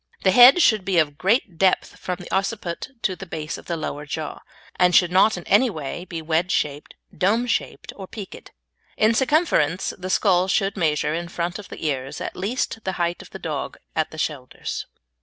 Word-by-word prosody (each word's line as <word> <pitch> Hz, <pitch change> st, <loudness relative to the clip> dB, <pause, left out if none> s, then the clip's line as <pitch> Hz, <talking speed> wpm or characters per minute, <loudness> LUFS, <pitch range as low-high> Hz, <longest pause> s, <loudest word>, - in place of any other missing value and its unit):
The 190 Hz, -, +5 dB
head 250 Hz, -, +8 dB
should 215 Hz, -4 st, +4 dB
be 185 Hz, -1 st, 0 dB
of 145 Hz, -3 st, +1 dB
great 195 Hz, -3 st, +1 dB
depth 190 Hz, -1 st, +2 dB
from 180 Hz, -, -3 dB
the 180 Hz, -1 st, -11 dB
occiput 195 Hz, 0 st, -2 dB
to 185 Hz, -, 0 dB
the 190 Hz, +2 st, -9 dB
base 155 Hz, -1 st, -5 dB
of -, -, -16 dB
the 170 Hz, -, -2 dB
lower 150 Hz, -1 st, -5 dB
jaw, -, -, -5 dB, 0.4 s
and 180 Hz, -1 st, +4 dB
should 175 Hz, -2 st, +5 dB
not 190 Hz, +3 st, +4 dB
in 175 Hz, -, -7 dB
any 225 Hz, +8 st, +4 dB
way 160 Hz, -1 st, -6 dB
be 165 Hz, -3 st, -6 dB
wedge 165 Hz, +3 st, 0 dB
shaped, 145 Hz, 0 st, -2 dB, 0.2 s
dome 215 Hz, +8 st, +2 dB
shaped, 240 Hz, -, -3 dB
or 190 Hz, -2 st, -8 dB
peaked. 200 Hz, -2 st, -9 dB, 0.5 s
In 215 Hz, +1 st, +4 dB
circumference 240 Hz, -, +2 dB
the 185 Hz, 0 st, -6 dB
skull 185 Hz, -2 st, +3 dB
should 195 Hz, +1 st, +1 dB
measure 155 Hz, -4 st, +1 dB
in 170 Hz, +1 st, -3 dB
front 175 Hz, +3 st, -3 dB
of 205 Hz, -, -11 dB
the -, -, -7 dB
ears 135 Hz, -1 st, -2 dB
at -, -, -5 dB
least 225 Hz, +4 st, -2 dB
the 190 Hz, -, -2 dB
height 175 Hz, -1 st, -1 dB
of -, -, -13 dB
the -, -, -8 dB
dog 155 Hz, -6 st, -4 dB, 0.2 s
at 160 Hz, -1 st, 0 dB
the 155 Hz, -, -11 dB
shoulders. 145 Hz, -5 st, -4 dB
180 Hz, 200 wpm, -23 LUFS, 160-200 Hz, 0.5 s, head